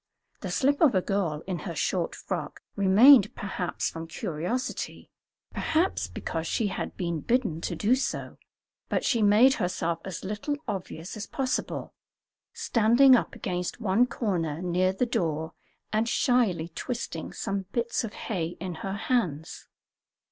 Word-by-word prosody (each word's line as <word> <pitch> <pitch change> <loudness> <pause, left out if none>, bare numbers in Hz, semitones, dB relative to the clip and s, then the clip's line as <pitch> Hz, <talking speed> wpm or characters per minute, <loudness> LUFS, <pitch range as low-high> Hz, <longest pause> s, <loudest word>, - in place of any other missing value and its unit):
The - - -5
slip 285 +3 +1
of 290 -9 +5
a 185 - +4
girl 175 -7 -1
in 185 -2 -3
her - - -6
short - - -1
frock - - -5
remained, 205 +5 +7
perhaps 190 -3 -3
from 165 0 -7
curiosity, 175 +10 -4 0.4
perhaps 330 +4 0
because 165 0 -4
she 215 +3 0
had - - -5
been 170 -3 -2
bidden 215 - 0
to 175 - -3
do 210 +8 +2
so, 260 - -2 0.5
but - - 0
she 235 -4 +2
made 215 +6 +6
herself 170 -4 -1
as 190 -3 -6
little 210 +9 -2
obvious 185 -4 -5
as 210 -1 -6
possible, 260 -1 -2 0.6
standing 240 +4 +5
up - - -1
against 180 +3 -3
one 220 +3 +3
corner 175 - -2
near 180 +1 +1
the 195 +6 0
door 160 -7 -1 0.4
and 220 +2 +1
shyly 210 -12 +2
twisting 170 -3 -5
some 195 -1 -3
bits 235 -1 -1
of 225 -2 -5
hay 175 -5 -3
in 180 +1 -4
her 195 - -3
hands. 200 - -2
195 Hz, 145 wpm, -27 LUFS, 170-235 Hz, 0.6 s, remained